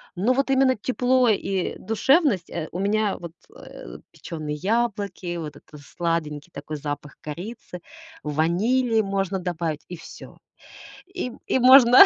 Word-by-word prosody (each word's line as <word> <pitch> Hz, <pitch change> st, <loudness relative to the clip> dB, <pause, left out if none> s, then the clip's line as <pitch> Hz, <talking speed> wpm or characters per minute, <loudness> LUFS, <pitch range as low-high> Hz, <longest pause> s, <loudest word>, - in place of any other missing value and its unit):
Но 215 Hz, +8 st, +2 dB
вот 275 Hz, +1 st, +1 dB
именно 265 Hz, -1 st, +4 dB
тепло 250 Hz, +2 st, +2 dB
и 195 Hz, -3 st, 0 dB
душевность, 225 Hz, -, +2 dB
э, 160 Hz, -2 st, -4 dB
у 175 Hz, -, -5 dB
меня 205 Hz, +1 st, +1 dB
вот, 170 Hz, -1 st, -9 dB, 0.2 s
э, -, -, -10 dB
печёные 155 Hz, -2 st, -5 dB
яблоки, 200 Hz, -3 st, -1 dB
вот 150 Hz, -3 st, -6 dB
это 150 Hz, -, -14 dB
сладенький 160 Hz, 0 st, -3 dB
такой 155 Hz, +2 st, -6 dB
запах 145 Hz, 0 st, -6 dB
корицы, 180 Hz, +3 st, -7 dB, 0.4 s
ванили 215 Hz, -, +2 dB
можно 195 Hz, -2 st, -1 dB
добавить 170 Hz, -4 st, -3 dB
и 175 Hz, -, -7 dB
всё. 165 Hz, -, -12 dB, 0.7 s
И, 370 Hz, -9 st, -5 dB
и -, -, +2 dB
можно. 255 Hz, +2 st, +9 dB
195 Hz, 135 wpm, -24 LUFS, 165-240 Hz, 0.7 s, можно